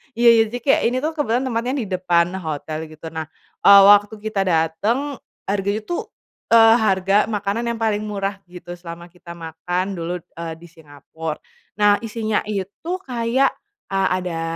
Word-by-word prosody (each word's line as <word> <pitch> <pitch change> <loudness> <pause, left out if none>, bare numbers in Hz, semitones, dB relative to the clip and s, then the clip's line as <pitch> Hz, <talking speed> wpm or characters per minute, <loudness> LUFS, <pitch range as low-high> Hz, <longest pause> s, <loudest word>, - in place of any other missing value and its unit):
iya 235 +1 +5
iya - - +6
jadi 245 +3 -5
kayak 275 - +3
ini 250 +2 -1
tuh 315 - 0
kebetulan 265 -5 -1
tempatnya 245 0 -2
di - - -6
depan 175 -2 +2
hotel 155 -1 -5
gitu 155 +1 -10
nah, 160 -1 -5 0.3
eee, 200 0 +8
waktu 205 +1 +4
kita 215 -2 -1
datang 205 - 0 0.3
harganya 200 +2 -1
tuh, 350 - -4 0.4
eee, 225 0 +7
harga 195 -1 +2
makanan 210 +1 -2
yang 235 - -2
paling 215 -2 0
murah 200 -1 -3
gitu 175 0 -10
selama 170 0 -10
kita 175 -1 -12
makan 170 +2 -3
dulu, 170 +2 -3
eee, 170 -1 -8
di 170 - -15
Singapura, 160 0 -8 0.4
nah 205 -1 +4
isinya 220 -1 -1
itu 200 - -5
kayak, 245 +2 +1 0.4
a 190 -1 +1
ada 170 -2 -4
195 Hz, 160 wpm, -21 LUFS, 170-225 Hz, 0.4 s, eee